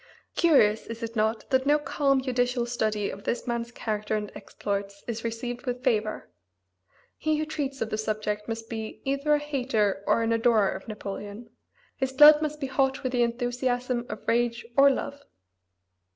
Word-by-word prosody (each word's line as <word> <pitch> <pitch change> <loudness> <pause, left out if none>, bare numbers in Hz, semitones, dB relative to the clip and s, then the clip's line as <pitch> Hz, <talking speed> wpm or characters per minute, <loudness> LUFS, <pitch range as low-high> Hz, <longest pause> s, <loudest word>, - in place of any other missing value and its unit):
Curious, 245 -11 +4
is 230 +1 -7
it 230 +1 -5
not, 220 +1 0
that 260 +1 +2
no 295 +1 +5
calm, 275 -3 +1
judicial 245 -1 0
study 215 -4 -1
of 200 - -9
this 240 - -2
man's 235 -1 -3
character 215 -2 -2
and 210 -1 -3
exploits 200 -1 -5
is 230 -1 -4
received 240 +3 -4
with 250 0 -3
favor? 220 -4 0 0.9
He 310 -1 +1
who 310 - -1
treats 290 -3 -4
of 220 - -7
the 215 - -1
subject 210 -1 -2
must 225 0 -5
be 220 -1 -6
either 280 +2 +2
a - - +3
hater 245 -9 0
or 210 +2 +3
an 230 0 +1
adorer 225 -3 +3
of - - -7
Napoleon; 205 +1 -7 0.5
his 265 -1 -1
blood 300 +2 +9
must 300 -1 -2
be 280 - -2
hot 265 0 0
with 255 - -1
the 245 -1 +1
enthusiasm 245 +1 -1
of 215 - -8
rage 235 0 +1
or 275 0 +7
of - - +3
love. 285 0 -5
240 Hz, 180 wpm, -27 LUFS, 215-265 Hz, 0.9 s, blood